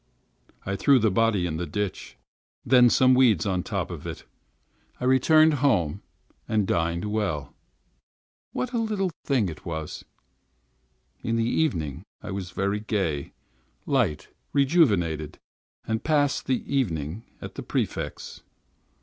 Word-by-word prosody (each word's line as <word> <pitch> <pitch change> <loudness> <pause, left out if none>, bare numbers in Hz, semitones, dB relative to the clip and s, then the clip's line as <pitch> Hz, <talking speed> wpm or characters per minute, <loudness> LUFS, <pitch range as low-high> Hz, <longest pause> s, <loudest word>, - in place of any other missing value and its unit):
I 100 - -2
threw 135 +8 +4
the 110 -3 +2
body 105 -2 +2
in 80 -2 -2
the 85 +1 -3
ditch, 100 +5 -4 0.5
and 125 -1 +6
some 130 0 +5
weeds 120 -10 +4
on 95 -2 0
top - - -3
of - - -7
it. - - -7 0.8
I - - -6
returned 155 +5 +5
home, 95 - +2 0.5
and 110 -2 +1
dined 85 +1 0
well. 105 -10 -2 1.0
What 255 0 -3
a 235 - +1
little 210 -5 -1
thing 130 -8 +2
it 80 -3 -8
was! 80 -2 -5 1.2
In 115 - -1
the 115 0 +1
evening 85 - 0 0.2
I - - -7
was 95 -2 -4
very 100 +3 -1
gay, 95 -10 -2 0.5
light, 115 - 0 0.2
rejuvenated; 105 - +2 0.5
I 110 - +1
passed 145 0 +1
the 130 -1 0
evening 85 - -1 0.2
at - - -8
the - - -6
Prefect's. - - -4
105 Hz, 130 wpm, -26 LUFS, 85-130 Hz, 1.2 s, and